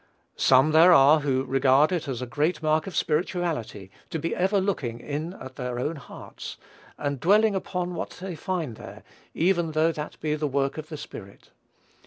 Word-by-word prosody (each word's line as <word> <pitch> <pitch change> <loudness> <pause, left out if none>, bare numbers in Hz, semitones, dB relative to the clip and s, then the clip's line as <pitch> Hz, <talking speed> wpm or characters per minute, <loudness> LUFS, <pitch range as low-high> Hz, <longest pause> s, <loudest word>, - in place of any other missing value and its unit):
Some 135 +4 +5
there 165 +3 +7
are 150 -1 +7
who 135 -3 0
regard 135 +3 +3
it 175 -3 -2
as 130 -2 -3
a - - -3
great 150 +6 -1
mark 155 +2 +1
of 190 - -7
spirituality 155 - -2 0.2
to - - -3
be 165 +2 -2
ever 190 +3 +2
looking 140 - -2
in 150 +7 -4
at 130 -7 -11
their 125 -1 -4
own 150 +6 -2
hearts, 135 - -10 0.4
and 140 -2 -3
dwelling 210 - +4
upon 180 -1 -3
what - - -4
they 185 0 -5
find 160 - -3
there, - - -11 0.3
even 170 -2 +1
though 160 +2 +3
that 150 -2 -7
be 155 -1 -1
the 150 0 -1
work 140 +2 -1
of 155 0 -8
the 155 - -6
Spirit. 100 -8 -11
155 Hz, 185 wpm, -26 LUFS, 135-175 Hz, 0.4 s, there